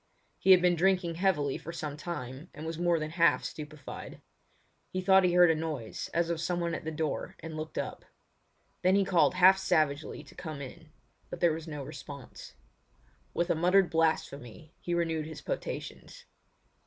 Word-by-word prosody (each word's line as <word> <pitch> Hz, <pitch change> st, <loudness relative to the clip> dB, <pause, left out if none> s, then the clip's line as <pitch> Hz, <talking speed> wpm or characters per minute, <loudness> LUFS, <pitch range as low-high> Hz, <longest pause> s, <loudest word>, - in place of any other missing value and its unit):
He -, -, 0 dB
had 185 Hz, -1 st, +8 dB
been 180 Hz, -1 st, +5 dB
drinking 180 Hz, 0 st, +2 dB
heavily 165 Hz, -6 st, +1 dB
for 165 Hz, -, -7 dB
some 150 Hz, -3 st, -5 dB
time 150 Hz, -2 st, -6 dB
and 155 Hz, -, -7 dB
was 165 Hz, 0 st, -4 dB
more 175 Hz, -1 st, +3 dB
than 155 Hz, -1 st, -4 dB
half 170 Hz, 0 st, +3 dB
stupefied. 150 Hz, -2 st, -8 dB, 0.7 s
He 185 Hz, -, -3 dB
thought 190 Hz, +1 st, +5 dB
he 180 Hz, -1 st, +3 dB
heard 175 Hz, -1 st, +7 dB
a -, -, +1 dB
noise 155 Hz, -8 st, -4 dB
as 170 Hz, 0 st, +1 dB
of 165 Hz, -1 st, -2 dB
someone 170 Hz, -1 st, -1 dB
at -, -, -4 dB
the -, -, -1 dB
door 155 Hz, -1 st, -3 dB
and 160 Hz, 0 st, -7 dB
looked 155 Hz, 0 st, -6 dB
up. -, -, -4 dB, 0.8 s
Then 185 Hz, +1 st, +4 dB
he 200 Hz, -1 st, +3 dB
called 180 Hz, -1 st, +3 dB
half 185 Hz, +1 st, +7 dB
savagely 150 Hz, -3 st, 0 dB
to 145 Hz, -, -16 dB
come 160 Hz, -5 st, -7 dB
in; 150 Hz, +4 st, -10 dB, 0.4 s
but -, -, -6 dB
there 170 Hz, -2 st, +4 dB
was 160 Hz, +1 st, -6 dB
no 150 Hz, -3 st, -5 dB
response. 140 Hz, -1 st, -10 dB, 0.8 s
With 170 Hz, +1 st, +1 dB
a -, -, +2 dB
muttered 180 Hz, +3 st, +3 dB
blasphemy 155 Hz, -3 st, -1 dB
he 175 Hz, -, -1 dB
renewed 165 Hz, -2 st, -1 dB
his 160 Hz, -, -9 dB
potations. -, -, -6 dB
165 Hz, 180 wpm, -30 LUFS, 155-180 Hz, 0.8 s, had